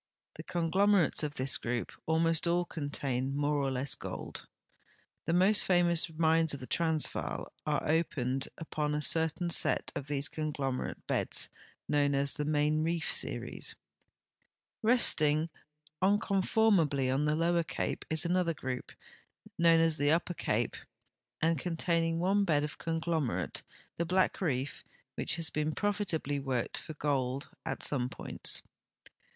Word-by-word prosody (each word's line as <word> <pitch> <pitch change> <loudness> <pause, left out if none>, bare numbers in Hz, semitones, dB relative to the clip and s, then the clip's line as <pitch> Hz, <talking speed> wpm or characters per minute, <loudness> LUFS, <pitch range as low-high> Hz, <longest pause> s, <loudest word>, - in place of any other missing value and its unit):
The - - -8
conglom 185 +4 +2
erates 180 -7 +3
of 150 -1 -3
this 130 +1 +3
group 120 0 -3 0.2
almost 165 +1 +2
all 175 +1 +2
contain 140 -4 -3
more 145 +1 +1
or 135 - 0
less 130 +1 -2
gold. - - -7 0.8
The - - 0
most 190 +4 +4
famous 175 -2 +2
mines 160 -1 +2
of - - -9
the 130 - -7
Transvaal 160 +1 0
are 150 -2 0
o})ened 135 -5 0
ui>on 150 -2 -2
a - - -2
certain 160 +3 +1
set - - +2
of 140 - -4
these 145 0 0
conglomerate 145 -4 -3
beds - - 0 0.4
known 145 -1 +2
as 140 0 +1
the 150 -2 -3
Main 150 +1 +1
Reef 165 0 0
series. - - 0 1.1
Resting 160 -9 +5 0.5
unconformably 190 - +2
on 140 +3 +1
the 150 0 +3
Lower 170 +1 +2
Cape 165 - -3
is 160 +2 -1
another 175 -1 +1
grou]) 130 -2 -4 0.8
known 165 -1 +5
as 165 -1 +3
the 145 0 +2
Upper 170 +2 +1
Cai)e - - -1 0.7
and 165 -2 +2
containing 165 0 0
one 195 +4 +2
bed 150 -6 +2
of 150 - -5
conglom 165 -3 -1
erate, 90 - -3 0.4
the 170 - 0
Black 185 +3 +1
Reef, 140 -5 -2 0.3
which - - -1
has 165 -2 0
been 155 +1 -1
profitabl}'' 175 -9 -1
worked 130 -3 -2
for 155 - -9
gold 135 -2 -1 0.2
at - - -3
.some 125 -3 +1
points. - - -1
160 Hz, 145 wpm, -31 LUFS, 145-170 Hz, 1.1 s, Resting